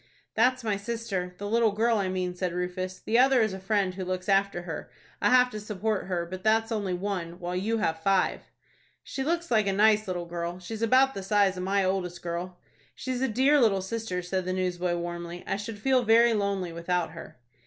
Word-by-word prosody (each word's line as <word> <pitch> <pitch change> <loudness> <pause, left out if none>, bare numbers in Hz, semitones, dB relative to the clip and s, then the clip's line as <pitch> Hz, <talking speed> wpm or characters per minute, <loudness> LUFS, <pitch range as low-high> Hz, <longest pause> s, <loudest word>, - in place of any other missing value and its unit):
"That's 250 +2 +2
my 210 -3 0
sister, 200 -4 -4
the 205 - -5
little 225 0 +2
girl 225 +1 +2
I 190 -2 0
mean," 185 -1 -2
said 180 -1 -3
Rufus, 180 +1 -3
"The 230 +2 +1
other 265 0 +5
is 215 -3 -1
a 190 - -6
friend 195 -1 0
who 190 0 -5
looks 185 0 -3
after 195 -2 +2
her. 165 -2 -6 0.3
I - - +4
have 250 0 +5
to 215 - -5
support 210 0 -2
her; 175 -2 -1
but 185 +2 -8
that's 225 +1 +2
only 200 -5 -1
one, 180 -2 -4
while 180 0 -4
you 215 +5 0
have 160 -7 -1
five." 195 +1 +2 0.6
"She 270 - -4
looks 340 +2 -1
like 215 -3 +3
a 195 - +1
nice 215 +1 +4
little 175 -2 -3
girl. 170 0 -4
She 185 +4 -8
is 220 - -5
about 260 +4 +4
the 195 - -5
size 195 -1 +2
of 180 - -5
my 195 +1 +1
oldest 180 -2 -2
girl." 175 +1 -4 0.4
"She's 255 -1 -3
a 265 - +2
dear 265 +5 +3
little 195 -5 +3
sister," 190 -3 -3
said 185 +1 -2
the 185 - -1
newsboy, 180 -1 -1
warmly. 175 0 -5
"I - - -1
should 210 +2 -6
feel 260 +4 +2
very 230 0 +5
lonely 200 -4 -1
without 170 0 -1
her." 165 -4 -11
195 Hz, 215 wpm, -27 LUFS, 180-225 Hz, 0.6 s, other